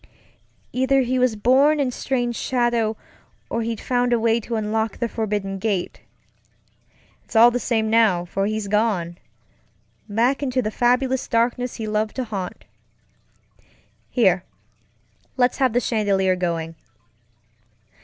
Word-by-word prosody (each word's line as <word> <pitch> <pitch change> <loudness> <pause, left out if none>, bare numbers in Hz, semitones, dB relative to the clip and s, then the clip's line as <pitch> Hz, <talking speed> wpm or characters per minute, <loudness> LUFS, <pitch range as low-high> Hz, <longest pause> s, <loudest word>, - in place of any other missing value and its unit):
Either 260 +2 +2
he 255 0 0
was 250 -3 +2
born 270 +8 +3
in 265 -3 0
strange 245 -1 -2
shadow, 240 -4 0 0.5
or 230 - -1
he'd 225 -1 -3
found 245 -1 0
a 240 - +3
way 230 0 +2
to 230 +1 -5
unlock 220 0 -1
the 235 - -1
forbidden 205 -4 -3
gate. 195 -3 -2 1.2
It's - - -15
all 235 +2 +7
the 245 - -1
same 225 -3 0
now, 215 -6 +3
for 195 +3 -2
he's 215 -1 -3
goneŌĆöback 200 -5 0 1.2
into 260 -2 -1
the 215 - -2
fabulous 255 +2 +1
darkness 240 +2 0
he 225 - -5
loved 215 0 -1
to 260 - -2
haunt. 195 -6 -6 1.4
Here, 190 -7 +2 0.9
let's 245 -1 +2
have 260 -2 +2
the 245 - +3
chandelier 200 -5 +1
going. 165 -2 -2
225 Hz, 130 wpm, -22 LUFS, 210-245 Hz, 1.4 s, all